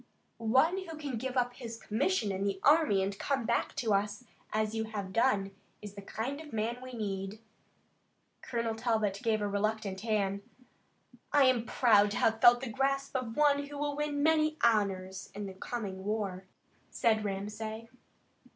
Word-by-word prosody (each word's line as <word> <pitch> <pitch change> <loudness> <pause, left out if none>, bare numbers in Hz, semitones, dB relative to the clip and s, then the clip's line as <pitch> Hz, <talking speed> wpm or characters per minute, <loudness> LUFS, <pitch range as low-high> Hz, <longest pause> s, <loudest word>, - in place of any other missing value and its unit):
"One 265 +11 +3
who 330 -4 -7
can 280 -6 -4
give 260 +2 -3
up 245 0 +1
his 235 -2 -7
commission 225 - 0
in 190 0 -2
the 200 -1 -1
army 290 -10 +5
and 195 +1 -2
come 270 -4 -1
back 235 0 0
to 235 -7 0
us 205 +4 0 0.3
as 215 0 0
you 220 0 -1
have 205 -4 -5
done 220 -5 +2 0.3
is 205 -1 -9
the 200 - -9
kind 255 +9 -4
of 310 - -11
man 225 +2 -2
we 255 0 -9
need." 200 -2 -4 1.0
Colonel 230 -2 -2
Talbot 220 -4 0
gave 220 -2 +1
a - - 0
reluctant 205 -1 -1
hand. 200 -3 0 0.9
"I 290 -1 +5
am 250 -3 +3
proud 210 -5 +4
to 205 - -3
have 225 0 +2
felt 240 0 +7
the 265 - -4
grasp 275 +4 -1
of 245 -3 -3
one 285 -1 +3
who 290 0 -8
will 290 0 -1
win 295 -1 -1
many 310 0 +3
honors 195 -4 +1
in 205 0 -4
the 195 - -6
coming 190 -1 -5
war," 200 -3 -2 0.4
said 220 -2 +2
Ramsay. 210 +3 -4
225 Hz, 170 wpm, -31 LUFS, 205-260 Hz, 1.0 s, felt